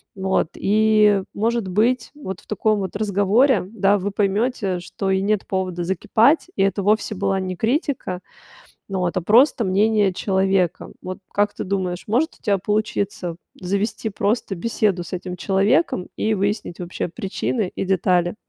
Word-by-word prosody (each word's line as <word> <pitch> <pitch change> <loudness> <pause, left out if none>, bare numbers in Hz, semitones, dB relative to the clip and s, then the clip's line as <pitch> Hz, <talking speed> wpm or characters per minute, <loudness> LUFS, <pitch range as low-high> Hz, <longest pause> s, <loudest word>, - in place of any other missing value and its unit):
Вот 190 -4 0
и, 210 -1 +3
может 230 +1 0
быть, 230 +5 +1
вот 190 -11 -7
в - - -24
таком 215 0 +1
вот 190 0 -4
разговоре, 210 +5 +3
да, 205 -2 +2
вы 200 +1 -3
поймете, 200 -1 0
что 190 +2 -4
и 190 0 +2
нет 205 0 0
повода 185 -2 -2
закипать, 220 - +2
и - - +1
это 195 0 0
вовсе 210 +1 +1
была 195 0 0
не 185 -1 -3
критика, 235 - -1 0.7
ну 195 -1 -2
вот, 180 0 -1
а - - +1
просто 235 - +4
мнение 205 +1 +2
человека. 190 -2 0
Вот 185 0 -6 0.2
как 205 0 +1
ты - - -4
думаешь, 185 -2 -2
может 265 +10 +1
у - - -41
тебя 200 -4 +2
получиться 200 -4 -2 0.2
завести 200 +4 -2
просто 205 0 -1
беседу 200 -2 0
с - - -11
этим 180 0 -4
человеком 195 - +1
и 220 0 +1
выяснить 200 -2 -2
вообще 175 0 -4
причины 195 +1 -2
и - - -2
детали? 180 -1 +1
200 Hz, 160 wpm, -22 LUFS, 185-215 Hz, 0.7 s, просто